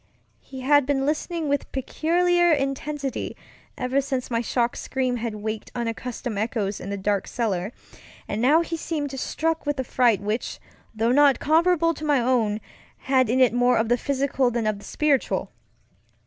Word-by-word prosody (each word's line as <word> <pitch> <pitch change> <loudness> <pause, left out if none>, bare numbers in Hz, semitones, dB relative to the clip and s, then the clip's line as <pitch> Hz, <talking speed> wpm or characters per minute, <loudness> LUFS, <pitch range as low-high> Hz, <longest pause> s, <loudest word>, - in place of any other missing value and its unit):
He 265 -1 -10
had 290 0 +4
been 270 -1 +1
listening 315 +2 -1
with 285 0 -1
peculiar 345 +6 +2
intensity 275 -1 -2 0.4
ever 255 +2 +1
since 265 -2 -3
my 230 0 +1
shocked 240 0 0
scream 255 -2 -1
had 230 -2 -3
waked 215 +1 -5
unaccustomed 235 -1 -4
echoes 210 -3 -2
in 195 - -7
the 200 - -3
dark 200 0 -1
cellar, 205 -4 -2 0.6
and 210 +2 -2
now 295 +7 +5
he 335 0 -3
seemed 310 -3 -3
struck 325 +2 -2
with 290 -2 -1
a - - +1
fright 240 -5 +2
which, 210 +4 -3 0.4
though 225 +2 +1
not 280 0 +5
comparable 330 +1 +3
to 310 - -9
my 295 -3 +3
own, 235 -4 +1 0.4
had 260 -3 +2
in 255 +3 +2
it 255 -3 +5
more 245 +1 +3
of 225 0 +1
the 240 - +4
physical 275 -1 0
than 235 -2 -2
of 215 -2 0
the - - -13
spiritual. 295 -4 0
260 Hz, 170 wpm, -24 LUFS, 230-290 Hz, 0.6 s, now